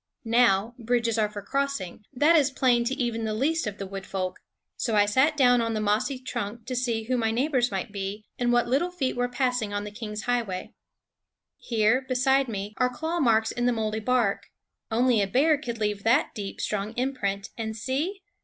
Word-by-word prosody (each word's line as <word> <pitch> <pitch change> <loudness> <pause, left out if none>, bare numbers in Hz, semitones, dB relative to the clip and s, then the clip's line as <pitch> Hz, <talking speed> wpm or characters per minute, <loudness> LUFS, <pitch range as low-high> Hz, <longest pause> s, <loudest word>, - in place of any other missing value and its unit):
Now 230 -2 +3
bridges 230 -1 0
are 210 -1 +2
for 205 -1 -7
crossing; 275 -7 -3
that 295 +5 +4
is 290 -4 +4
plain 250 -3 +2
to 260 +3 -1
even 235 -4 -2
the 215 -1 -1
least 305 +4 0
of 205 -1 -4
the 195 - -5
wood 195 0 -7
folk; 185 -2 -3 0.4
so 230 -3 -1
I 205 -1 +5
sat 265 +9 +2
down 245 -3 +5
on 230 -1 -1
the - - 0
mossy 215 +6 0
trunk 230 -3 -5
to 255 - -4
see 235 -3 -1
who 250 +3 0
my 225 -1 +1
neighbors 250 +1 +1
might 195 +1 -4
be, 200 +1 -5
and 240 -1 +2
what 240 -1 +3
little 275 +9 +1
feet 295 -8 -2
were 245 0 0
passing 245 -5 -1
on 205 - -2
the 210 - -7
King's 210 -1 -6
highway. 230 -7 -2 0.9
Here, 225 +2 +2
beside 265 +1 +2
me, 205 -2 -4
are 250 0 +2
claw 320 +7 -3
marks 225 -5 +3
in 245 0 -1
the 245 - +3
moldy 220 -1 -1
bark. 230 -3 +1 0.4
Only 235 0 +3
a 200 - +1
bear 290 +9 +4
could 245 -5 -5
leave 210 -2 -1
that 245 +7 +3
deep, 200 -2 -6
strong 210 +1 -2
imprint. 220 -6 -2
And 220 -1 -4
see 290 - -2
235 Hz, 200 wpm, -26 LUFS, 210-255 Hz, 0.9 s, I